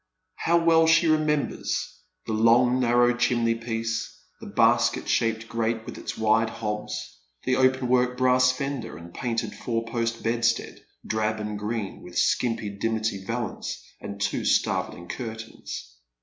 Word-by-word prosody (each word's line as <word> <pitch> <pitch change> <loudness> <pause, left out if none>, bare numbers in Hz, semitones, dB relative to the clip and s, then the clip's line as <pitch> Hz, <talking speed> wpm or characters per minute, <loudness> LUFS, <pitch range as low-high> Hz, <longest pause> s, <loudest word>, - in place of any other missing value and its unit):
How 170 +1 +3
well 165 -1 +5
she 165 +1 +5
remembers 155 -2 0 0.2
the 110 - -3
long 120 +3 +4
narrow 120 0 +4
chimney 120 -1 +2
piece, 115 0 -3 0.2
the - - -9
basket - - +3
shaped 115 -1 +1
grate 115 0 -1
with - - -7
its - - -5
wide 110 +1 +3
hobs, 105 - -5 0.2
the 130 - +2
open 130 0 +3
work 125 0 +2
brass 130 0 +4
fender, 135 -4 -4
the 85 +1 -11
painted 115 +5 -3
four 115 -1 -2
post 115 0 -2
bedstead, 115 0 0 0.2
drab 110 0 -1
and 105 -1 -4
green, 105 -1 -4
with 90 0 -8
skimpy 115 -4 +1
dimity 110 -3 -1
valance, 115 - -4 0.2
and 100 0 -7
two 105 +1 -1
starveling 85 0 0
curtains. 110 - -7
115 Hz, 140 wpm, -26 LUFS, 110-125 Hz, 0.2 s, well